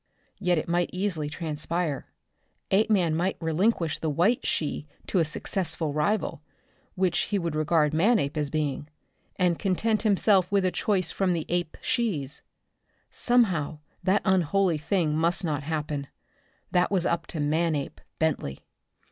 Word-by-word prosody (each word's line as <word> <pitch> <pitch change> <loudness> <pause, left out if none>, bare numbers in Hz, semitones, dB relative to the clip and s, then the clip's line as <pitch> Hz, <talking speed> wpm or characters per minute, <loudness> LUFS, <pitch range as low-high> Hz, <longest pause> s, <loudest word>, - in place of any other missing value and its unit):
Yet 180 -3 +2
it 155 - -2
might 175 +1 +1
easily 180 -6 -1
transpire. 160 -1 -3 0.6
Apeman 195 -5 +3
might 180 +4 0
relinquish 165 0 +1
the 160 - -1
white 180 +11 +2
she 150 -1 -2 0.2
to 190 - +1
a - - +4
successful 160 -1 -2
rival 160 0 0 0.5
which 185 -2 +1
he 205 - +1
would 170 -4 -2
regard 155 0 +2
Manape 165 -3 +2
as 150 -2 -1
being 145 -1 -2 0.5
and 180 -3 +1
content 215 +3 +1
himself 200 -3 +3
with 200 -2 +3
a 185 - +2
choice 185 -6 0
from 190 -2 +1
the 165 -2 -2
ape 175 -2 -1
she's. 165 - -1 0.7
Somehow 185 -12 +2 0.2
that 200 +2 +2
unholy 190 -2 +2
thing 160 -1 0
must 170 +3 +1
not 150 -2 -1
happen. 150 -2 -3 0.6
That 180 0 +3
was 185 -4 +1
up 170 0 0
to 160 - -5
Manape 150 -1 0 0.2
Bentley. 150 - -1
170 Hz, 140 wpm, -27 LUFS, 155-190 Hz, 0.7 s, a